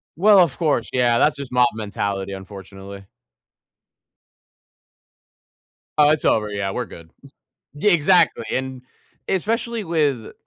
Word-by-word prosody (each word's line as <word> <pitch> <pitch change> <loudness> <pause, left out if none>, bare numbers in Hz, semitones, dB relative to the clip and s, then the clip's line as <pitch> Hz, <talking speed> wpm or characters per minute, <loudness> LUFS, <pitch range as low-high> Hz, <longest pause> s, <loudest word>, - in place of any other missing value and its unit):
Well, 200 +3 +5
of 165 -7 +2
course, 150 -8 0
yeah, 120 -2 +2
that's 150 +2 +3
just 140 -3 -8
mob 125 -1 +4
mentality, 100 -2 -4
unfortunately. 95 0 -11 2.9
Oh, 150 0 +6
it's 155 - -1
over, 105 -1 +1
yeah, 100 -1 -3
we're 125 +4 -3
good. 85 -5 -14 0.7
Yeah, 185 +7 +2
exactly, 170 -7 +3
and 130 -1 -4 0.5
especially 225 +4 -2
with 145 - -1
125 Hz, 115 wpm, -21 LUFS, 100-160 Hz, 2.9 s, Oh